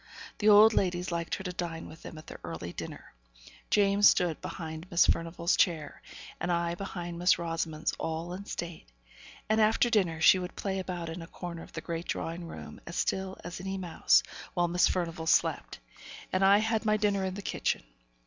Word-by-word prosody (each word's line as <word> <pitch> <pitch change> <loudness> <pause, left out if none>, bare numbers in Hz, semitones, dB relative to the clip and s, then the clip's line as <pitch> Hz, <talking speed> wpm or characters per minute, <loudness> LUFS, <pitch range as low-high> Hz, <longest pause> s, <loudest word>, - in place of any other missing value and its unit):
The 215 - +4
old 215 +2 +8
ladies 180 -2 0
liked 170 -1 -2
her 190 - -7
to 180 - -3
dine 170 -2 -4
with 160 - -12
them 160 - -9
at 155 - -11
their - - -10
early 85 +1 -6
dinner. - - -8 0.6
James 205 0 +5
stood 175 -4 +1
behind 160 0 -6
Miss 170 - +5
Furnivall's 170 +1 +1
chair, 160 -5 0 0.4
and 175 - -1
I 170 0 0
behind 175 -2 -6
Miss 180 +1 +4
Rosamond's 165 -2 -2
all 165 +2 -3
in 195 +2 -7
state; 170 - -6 0.6
and 215 +1 +3
after 220 +2 +3
dinner, 180 -8 +2
she 185 +3 +7
would 180 0 -6
play 195 -1 -2
about 175 -3 -4
in 165 +2 -6
a 165 - -8
corner 170 -1 -7
of - - -13
the - - -5
great 170 0 -5
drawing 170 +1 -4
room - - -9
as 170 - -6
still 190 0 -1
as 175 0 -6
any 195 +1 -3
mouse, 175 -4 +3 0.3
while 175 -1 +2
Miss 175 +1 +3
Furnivall 165 -3 -2
slept, - - +2 0.6
and 185 +1 +2
I 195 +1 +7
had 220 +1 0
my 215 -1 +2
dinner 200 -2 +1
in 190 0 -2
the 205 - -7
kitchen. - - -1
175 Hz, 195 wpm, -30 LUFS, 165-195 Hz, 0.6 s, old